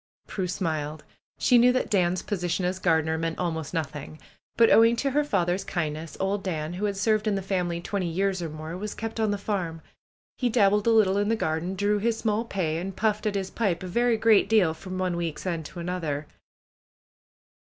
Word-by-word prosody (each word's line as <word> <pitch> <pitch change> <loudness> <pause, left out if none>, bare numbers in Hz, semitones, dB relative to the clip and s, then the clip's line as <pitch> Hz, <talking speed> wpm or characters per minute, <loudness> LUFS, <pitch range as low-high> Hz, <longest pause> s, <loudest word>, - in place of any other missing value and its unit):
Prue 190 -3 -3
smiled. 155 -4 -3 0.3
She 245 -2 +5
knew 245 +1 +6
that 255 - -1
Dan's 180 -2 +2
position 180 -2 -1
as 185 +1 -1
gar 165 -4 +3
dener 160 +1 -1
meant 165 0 -2
almost 160 -4 -3
nothing. 155 -2 -4 0.4
But 230 -1 +6
owing 230 +1 +6
to 275 +3 -1
her 295 +3 +2
father's 185 -7 0
kindness 160 -3 -4
old 195 +1 0
Dan, 160 -3 -3
who 190 +4 -2
had 200 -1 -2
served 215 +1 +1
in 210 - +2
the 195 - -2
family 180 -3 -1
twenty 190 0 -2
years 190 +2 0
or 165 - -3
more, 155 +2 -7
was 205 +3 -5
kept 225 0 -5
on 220 -1 +2
the 205 - 0
farm. 185 -5 -3 0.6
He 250 - +1
dabbled 210 -2 +3
a - - +6
little 205 -3 +4
in 205 +1 +1
the 225 - +3
garden, 170 -1 -2
drew 205 +2 +1
his 225 +2 0
small 220 +1 0
pay, 170 -7 -1
and 190 +2 -5
puffed 215 -1 0
at 205 - -1
his 190 -1 -2
pipe 190 -6 -1
a - - -5
very 235 +5 +2
great 220 -2 +4
deal 200 -8 +4
from 185 +3 -7
one 185 -1 -1
week's 170 -1 -4
end 165 -4 -2
to 175 - -10
an 170 - -5
other. 155 -5 -2
190 Hz, 215 wpm, -26 LUFS, 170-210 Hz, 0.6 s, knew